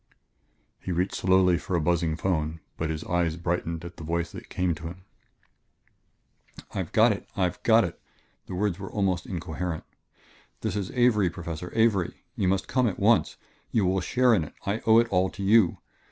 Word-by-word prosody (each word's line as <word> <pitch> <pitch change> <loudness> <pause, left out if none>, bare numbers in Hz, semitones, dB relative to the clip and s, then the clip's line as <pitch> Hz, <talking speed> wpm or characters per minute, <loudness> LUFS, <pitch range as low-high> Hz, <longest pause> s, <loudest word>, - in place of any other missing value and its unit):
He 95 - -5
reached 90 +2 0
slowly 95 -1 +3
for 90 - -3
a - - +2
buzzing 85 0 +1
phone, 80 -2 -1 0.2
but 80 - -2
his 80 0 -3
eyes 85 -2 0
brightened 85 -1 -2
at 85 0 -9
the - - -8
voice 85 +1 -2
that - - -10
came 90 -1 0
to 80 +1 -7
him. 90 +2 -10 1.7
"I've - - -3
got - - +5
it - - -5
I've 90 -2 0
got 115 0 +5
it!" 85 -3 -5 0.5
The 90 - -5
words 100 -1 -1
were 95 - -6
almost 95 -4 -1
incoherent. 85 -1 -4 0.8
"This - - -2
is 100 -3 -2
Avery, 115 -7 +4
Professor 85 0 -6
Avery! 110 -6 +1
You 95 - 0
must 95 0 +1
come 130 -2 +2
at 100 - -2
once. 100 -4 +3 0.3
You 105 -4 +1
will 95 +1 +1
share 125 +4 +3
in 95 -7 +3
it; 75 - -10
I 100 +3 0
owe 110 0 +7
it 115 0 +5
all 95 -1 +2
to 100 - -7
you 105 -2 +4
90 Hz, 185 wpm, -27 LUFS, 85-100 Hz, 1.7 s, owe